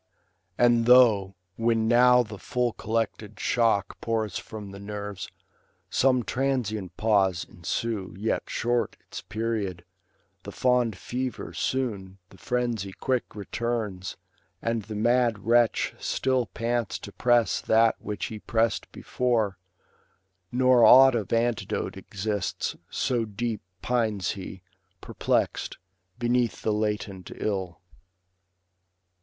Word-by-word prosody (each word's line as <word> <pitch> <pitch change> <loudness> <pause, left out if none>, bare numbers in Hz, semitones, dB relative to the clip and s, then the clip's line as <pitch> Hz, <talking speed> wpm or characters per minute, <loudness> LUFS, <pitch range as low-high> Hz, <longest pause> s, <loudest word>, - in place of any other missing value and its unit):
And 120 -1 +4
though, 110 -6 +6 0.2
when 115 -1 +2
now 125 +1 +6
the 105 -3 -9
full 125 -2 -1
collected 110 -1 -3
shock 115 -5 +1
Pours 110 -3 -1
from 105 -3 -9
the 100 - -9
nerves, 105 -2 -6 0.6
some 130 -2 +3
transient 110 - -2
pause 100 -5 +2
ensue. 95 +2 -3
Yet 110 +3 -2
short 120 0 -1
its - - -8
period; 105 -6 -3 0.6
the 100 - -8
fond 125 -3 +1
fever 125 +5 -4
soon. 100 -8 -2
The 95 - -16
frenzy 120 -6 -2
quick 130 0 -2
returns, 105 -3 -3 0.4
and 115 -1 -1
the 105 +1 -8
mad 115 -1 +2
wretch 120 0 +3
Still 130 -3 0
pants 115 -1 -2
to 100 - -10
press 120 0 +2
that 115 0 +4
which 105 -4 -4
he 110 - -6
press'd 115 +2 0
before; 115 -6 -1 0.9
Nor 125 -1 +4
aught 135 +1 +9
of 110 -4 -2
antidote 115 -1 0
exists, 100 -1 -3
so 125 -3 0
deep 110 +1 -3 0.2
Pines 110 -7 0
lie, 95 -1 -8 0.4
perplext, - - -1 0.4
beneath 120 0 0
the 110 - +1
latent 105 -3 -2
ill. 95 -5 -3
115 Hz, 115 wpm, -26 LUFS, 100-120 Hz, 0.9 s, aught